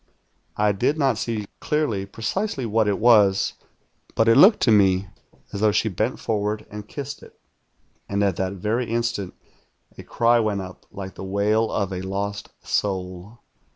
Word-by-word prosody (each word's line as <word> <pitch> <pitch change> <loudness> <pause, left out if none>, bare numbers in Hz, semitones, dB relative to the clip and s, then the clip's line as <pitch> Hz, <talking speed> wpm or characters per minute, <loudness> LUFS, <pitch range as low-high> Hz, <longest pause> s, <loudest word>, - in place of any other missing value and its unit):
I 105 0 +3
did 125 +10 0
not 135 -7 +1
see 110 -3 -3
clearly 115 -11 -1
precisely 135 - -3
what 110 -1 +1
it 100 -2 +1
was; 105 -4 +4 0.6
but 115 - +2
it 115 - +6
looked 195 - +7
to 115 - +4
me 95 -2 +3 0.4
as 100 - -3
though 110 -1 +4
she 110 - +1
bent 110 +6 -2
forward 105 -1 -2
and 105 0 -8
kissed 140 +2 -7
it; - - -17 0.7
and 100 0 0
at 100 -3 +1
that 95 0 -2
very 110 +5 -2
instant 115 -5 -2 0.6
a - - -9
cry 120 0 +2
went 105 -3 0
up 90 -1 -11
like 95 -1 -7
the - - -9
wail 105 +3 +1
of 100 -2 -1
a 90 - -4
lost 100 +1 -4
soul. 95 +2 -3
105 Hz, 165 wpm, -23 LUFS, 100-115 Hz, 0.7 s, looked